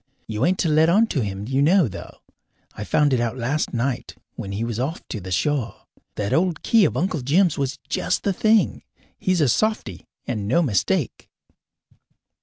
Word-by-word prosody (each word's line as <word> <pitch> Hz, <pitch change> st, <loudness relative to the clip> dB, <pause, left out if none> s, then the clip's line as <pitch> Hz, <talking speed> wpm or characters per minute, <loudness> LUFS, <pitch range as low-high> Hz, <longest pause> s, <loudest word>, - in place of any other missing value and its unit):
You 110 Hz, +3 st, -1 dB
ain't 185 Hz, +1 st, +1 dB
to 175 Hz, -, 0 dB
let 155 Hz, +1 st, +4 dB
on 210 Hz, +6 st, +5 dB
to 140 Hz, -, 0 dB
him 100 Hz, -1 st, -4 dB
you 135 Hz, +2 st, +1 dB
know, 170 Hz, +1 st, +4 dB
though. 95 Hz, -, -10 dB, 0.5 s
I 105 Hz, -, -6 dB
found 145 Hz, +6 st, +2 dB
it 125 Hz, -, +2 dB
out 120 Hz, +1 st, -2 dB
last 130 Hz, +6 st, -1 dB
night 120 Hz, +1 st, -2 dB, 0.2 s
when 100 Hz, -, -7 dB
he 100 Hz, +3 st, -3 dB
was 115 Hz, -1 st, -3 dB
off 140 Hz, +7 st, -4 dB
to 110 Hz, -, -5 dB
the 95 Hz, +1 st, -8 dB
shore. 135 Hz, +3 st, 0 dB, 0.4 s
That 100 Hz, -1 st, -2 dB
old 170 Hz, -1 st, +1 dB
key 225 Hz, -4 st, +4 dB
of -, -, -1 dB
Uncle 165 Hz, -4 st, -1 dB
Jim's 165 Hz, +6 st, +2 dB
was 140 Hz, 0 st, -2 dB
just -, -, -1 dB
the 200 Hz, -, +1 dB
thing. 220 Hz, +3 st, +2 dB, 0.4 s
He's 185 Hz, -3 st, +1 dB
a 145 Hz, -, +4 dB
softy, 170 Hz, -, -1 dB, 0.2 s
and 105 Hz, -5 st, -3 dB
no 170 Hz, +10 st, +3 dB
mistake." 105 Hz, -, -1 dB
140 Hz, 190 wpm, -22 LUFS, 115-170 Hz, 0.5 s, on